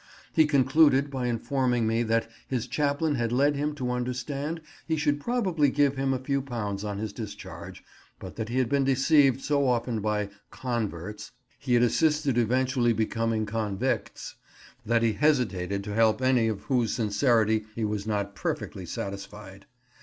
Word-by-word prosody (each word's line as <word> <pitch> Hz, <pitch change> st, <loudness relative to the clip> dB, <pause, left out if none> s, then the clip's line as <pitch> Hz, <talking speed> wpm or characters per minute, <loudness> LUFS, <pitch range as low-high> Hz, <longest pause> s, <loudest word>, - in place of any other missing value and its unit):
He 160 Hz, -1 st, +5 dB
concluded 140 Hz, 0 st, +4 dB
by 130 Hz, -2 st, -2 dB
informing 120 Hz, 0 st, 0 dB
me 115 Hz, +1 st, +1 dB
that 115 Hz, 0 st, +1 dB, 0.2 s
his 125 Hz, -3 st, -2 dB
chaplain 145 Hz, +4 st, 0 dB
had 120 Hz, -4 st, -1 dB
led 140 Hz, +4 st, +3 dB
him 145 Hz, +1 st, -2 dB
to 125 Hz, -3 st, -2 dB
understand 125 Hz, +6 st, -3 dB, 0.3 s
he 160 Hz, -, +1 dB
should 145 Hz, -1 st, +1 dB
probably 185 Hz, -, +1 dB
give 140 Hz, 0 st, +2 dB
him 135 Hz, 0 st, 0 dB
a 130 Hz, -, +1 dB
few 140 Hz, +2 st, -1 dB
pounds 105 Hz, -7 st, -4 dB
on 105 Hz, -1 st, -3 dB
his 105 Hz, -1 st, -4 dB
discharge, 105 Hz, -1 st, -8 dB, 0.3 s
but -, -, -9 dB
that 110 Hz, -1 st, -4 dB
he 120 Hz, -, -2 dB
had 130 Hz, -2 st, +2 dB
been 140 Hz, +2 st, +2 dB
deceived 135 Hz, 0 st, +4 dB
so 140 Hz, -1 st, +1 dB
often 120 Hz, -2 st, 0 dB
by 105 Hz, -1 st, -1 dB, 0.2 s
"converts" 105 Hz, -4 st, -4 dB, 0.3 s
he 125 Hz, -3 st, +1 dB
had 120 Hz, -, +4 dB
assisted 150 Hz, +1 st, +2 dB
eventually 125 Hz, +1 st, +2 dB
becoming 115 Hz, 0 st, 0 dB
"convicts," 105 Hz, -2 st, -2 dB, 0.5 s
that 115 Hz, +1 st, +1 dB
he 115 Hz, -1 st, +2 dB
hesitated 100 Hz, -7 st, +1 dB
to 105 Hz, 0 st, -5 dB
help 110 Hz, +1 st, +3 dB
any 130 Hz, -3 st, +3 dB
of 110 Hz, -3 st, -2 dB
whose 120 Hz, -6 st, +1 dB
sincerity 110 Hz, -1 st, +2 dB
he 115 Hz, -, -1 dB
was 105 Hz, 0 st, -3 dB
not 100 Hz, -2 st, -1 dB
perfectly 100 Hz, -, -4 dB
satisfied. 100 Hz, 0 st, -7 dB
120 Hz, 160 wpm, -27 LUFS, 110-140 Hz, 0.5 s, He